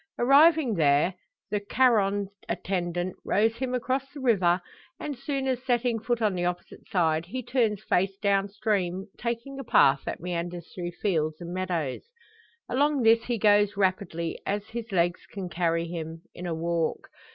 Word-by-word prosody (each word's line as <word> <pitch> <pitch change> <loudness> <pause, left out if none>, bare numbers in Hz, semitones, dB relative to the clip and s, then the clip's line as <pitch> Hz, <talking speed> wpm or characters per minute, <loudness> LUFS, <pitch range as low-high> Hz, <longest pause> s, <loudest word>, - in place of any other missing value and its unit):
Arriving 285 +1 +5
there, 155 +1 +3 0.4
the 210 - +1
Charon 205 -3 +2 0.2
attendant 175 -1 -2
rows 225 +2 +2
him 255 0 -2
across 260 +2 -2
the 290 - -9
river; 190 -9 +3 0.4
and, 290 - -4
soon 275 +1 -3
as 255 -1 0
setting 245 -2 +1
foot 235 +1 -1
on 210 -2 +2
the 175 -1 -2
opposite 175 0 -4
side, 165 -2 +1
he 255 +6 -5
turns 220 -5 0
face 190 -1 +1
down 200 -1 +1
stream, 195 -3 -1
taking 240 +4 -4
a - - -4
path 135 - +4
that - - -4
meanders 175 0 -4
through 175 -1 -4
fields 160 -4 -1
and 175 0 -6
meadows. 175 -7 -2 0.7
Along 285 +1 +1
this 225 +1 +5
he 240 -1 -1
goes 205 -1 +4
rapidly 185 -4 -1
as 205 +1 -3
his 230 -1 -6
legs 175 -1 0
can 190 -3 -6
carry 170 0 0
him 165 -1 -6
in 180 - -6
a 165 - -2
walk. 165 0 -2
200 Hz, 165 wpm, -27 LUFS, 175-235 Hz, 0.7 s, Arriving